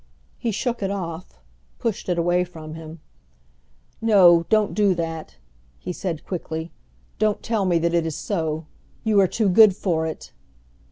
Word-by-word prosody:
He 235 - -1
shook 235 +2 -2
it 195 - -1
off, 180 - -5 0.4
pushed 225 -5 -3
it 175 - +1
away 175 +1 +2
from 160 -3 -9
him. 160 0 -10 1.0
"No, 180 -7 +6
don't 215 -1 +2
do 205 -3 +3
that," 165 -1 -5 0.4
he 180 - -6
said 170 -3 -4
quickly. 160 -2 -5 0.5
"Don't 215 0 +1
tell 220 -4 0
me 175 -2 +3
that 170 +1 0
it 170 -1 +1
is 160 - -4
so. 160 -5 -2 0.4
You 215 -2 +3
are 195 - +5
too 215 +3 0
good 200 +1 +7
for 165 -5 -1
it!" 160 - -7
175 Hz, 160 wpm, -23 LUFS, 165-205 Hz, 1.0 s, good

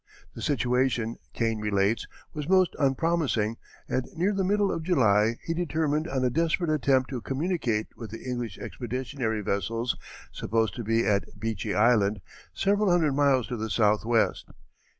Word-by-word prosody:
The - - -9
situation, 125 -4 0
Kane 115 -2 -1
relates, 105 0 +1 0.3
was 150 +1 -5
most 185 -1 +4
unpromising, 135 -6 +1 0.3
and 130 - -1
near 185 +5 +1
the 195 -1 0
middle 200 +1 +2
of - - -2
July 115 - +3
he 165 - -2
determined 160 -2 0
on 130 -5 -1
a 125 - +2
desperate 165 +2 +1
attempt 135 -3 +2
to 125 -3 -3
communicate 135 - -1
with 115 -3 -8
the 115 +4 -9
English 120 -5 -3
expeditionary 125 -2 -3
vessels 115 +5 -1 0.4
supposed 110 +1 0
to 120 - -3
be 115 +2 +1
at 105 0 -1
Beechy 110 -1 -2
Island, 105 -2 +3 0.3
several 200 - +1
hundred 165 -5 +3
miles 135 -3 +3
to 120 - -3
the 110 0 -3
southwest. 110 +2 +2
125 Hz, 150 wpm, -27 LUFS, 110-155 Hz, 0.4 s, most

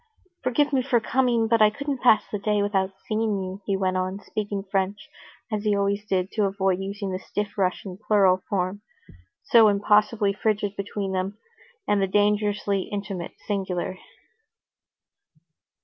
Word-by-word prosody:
"Forgive 285 +3 +1
me 265 - +3
for 250 -2 +2
coming, 235 -1 +1
but 225 0 +3
I 215 - +7
couldn't 280 +3 -4
pass 245 -4 +5
the 210 - -2
day 210 0 +1
without 195 -2 0
seeing 215 -1 0
you," 190 +2 -7
he 195 -1 +1
went 185 -1 0
on, 185 +1 -2
speaking 205 -1 -4
French, 195 +1 -2 0.4
as 210 -1 -2
he 210 -1 +2
always 200 +1 0
did 185 -1 0
to 210 -3 +1
avoid 195 -1 0
using 195 0 -4
the 185 - -3
stiff 205 +1 -4
Russian 185 -1 -2
plural 190 -3 +4
form, 190 +1 -1 0.6
so 230 -2 +6
impossibly 210 +1 +3
frigid 205 -1 -1
between 200 0 -4
them, 190 +2 -2 0.5
and 205 -1 +2
the 195 - +2
dangerously 205 -1 +1
intimate 200 -4 -4
singular. 185 -2 -2
205 Hz, 150 wpm, -25 LUFS, 195-215 Hz, 0.6 s, I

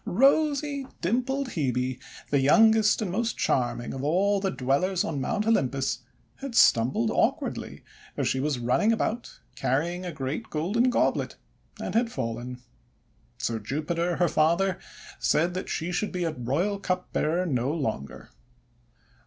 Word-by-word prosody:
rosy, 280 - +2
dimpled 255 +8 0
Hebe, 130 - -1 0.3
the 140 - +4
youngest 220 - +5
and 190 - -3
most 225 +4 -1
charming 120 -2 0
of 135 - -5
all 195 +7 +2
the 195 0 0
Dwellers 170 +7 0
on 145 -4 -3
Mount 205 +10 -1
Olympus, 135 - +1 0.4
had 275 -3 -6
stumbled 115 - +4
awkwardly - - -1 0.3
as - - 0
she 130 - 0
was 145 0 0
running 125 - +2
about 230 +1 -2 0.2
carrying 165 +9 -1
a 180 - -4
great 150 +8 -4
golden 205 +11 +1
goblet, 250 - +1 0.4
and - - -4
had 230 +1 +2
fallen. 120 - -5 0.7
So 115 -1 -2
Jupiter, 165 +9 -2
her 175 +2 +2
father, 170 +4 +2 0.4
said 170 +3 +2
that 185 - -4
she 170 +3 -2
should 210 +4 -1
be 180 -2 -2
royal 160 - -1
cupbearer 180 -2 -1
no 130 -4 0
longer. 110 - -4
170 Hz, 135 wpm, -27 LUFS, 135-210 Hz, 0.7 s, youngest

